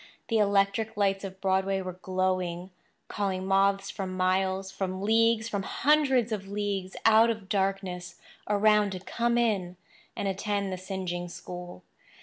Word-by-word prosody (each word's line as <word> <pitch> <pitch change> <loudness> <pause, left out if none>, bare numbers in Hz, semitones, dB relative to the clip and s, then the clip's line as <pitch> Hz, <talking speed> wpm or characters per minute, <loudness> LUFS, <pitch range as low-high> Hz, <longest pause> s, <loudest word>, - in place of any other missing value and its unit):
The 225 -2 +2
electric 200 +2 +1
lights 195 -1 +1
of 190 -1 -7
Broadway 190 0 +1
were 185 -1 -6
glowing—calling 185 +1 -3
moths 195 +1 +2
from 185 -2 -5
miles, 190 +1 +1
from 190 0 -3
leagues, 225 +1 +3
from 205 -3 -2
hundreds 265 0 +2
of 200 -3 -3
leagues 200 -2 -3
out 225 +1 +6
of 220 -4 -3
darkness 195 -3 -2 0.3
around 210 -1 +3
to 185 - -5
come 235 +5 0
in 195 -7 0 0.4
and 200 - -2
attend 200 0 -1
the - - -3
singeing 185 -2 -4
school. 175 - -9
195 Hz, 135 wpm, -28 LUFS, 185-210 Hz, 0.4 s, out